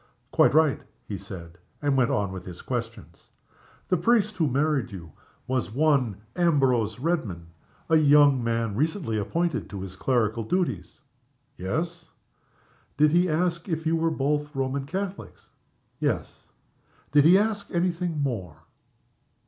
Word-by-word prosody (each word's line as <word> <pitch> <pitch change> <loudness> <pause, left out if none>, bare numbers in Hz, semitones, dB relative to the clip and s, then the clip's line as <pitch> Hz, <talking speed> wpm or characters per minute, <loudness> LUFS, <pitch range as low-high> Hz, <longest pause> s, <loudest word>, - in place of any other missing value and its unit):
"Quite - - +4
right," 155 -3 +3 0.2
he 105 - -5
said, 85 -2 -9 0.2
and 145 -2 +1
went 125 -3 +3
on 100 -2 0
with 95 -1 -7
his 90 -2 -10
questions. - - -6 0.6
"The 185 - +3
priest 215 +3 +2
who 160 -4 +2
married 140 -2 0
you 85 -5 -9 0.3
was 130 -7 -1
one 135 -6 +2 0.2
Ambrose 135 - +2
Redman 125 - -2 0.4
a 160 - +4
young 145 -3 +5
man 115 -2 -1
recently 150 - -1
appointed 170 +9 -1
to 100 -2 -6
his 95 -1 -7
clerical 115 0 0
duties?" 110 - -2 0.5
"Yes." 165 - -4 0.9
"Did 150 0 +5
he 175 +2 +3
ask 170 +3 -1
if 160 -1 -2
you 160 +1 +2
were 165 0 +1
both 150 0 -1
Roman 135 +1 -2
Catholics?" 190 +4 -6 0.5
"Yes." - - -2 0.7
"Did 145 0 +6
he 175 +5 +7
ask 210 -1 -1
any 175 +1 +1
thing 170 -4 -3
more?" 95 - -4
145 Hz, 140 wpm, -26 LUFS, 110-165 Hz, 0.9 s, he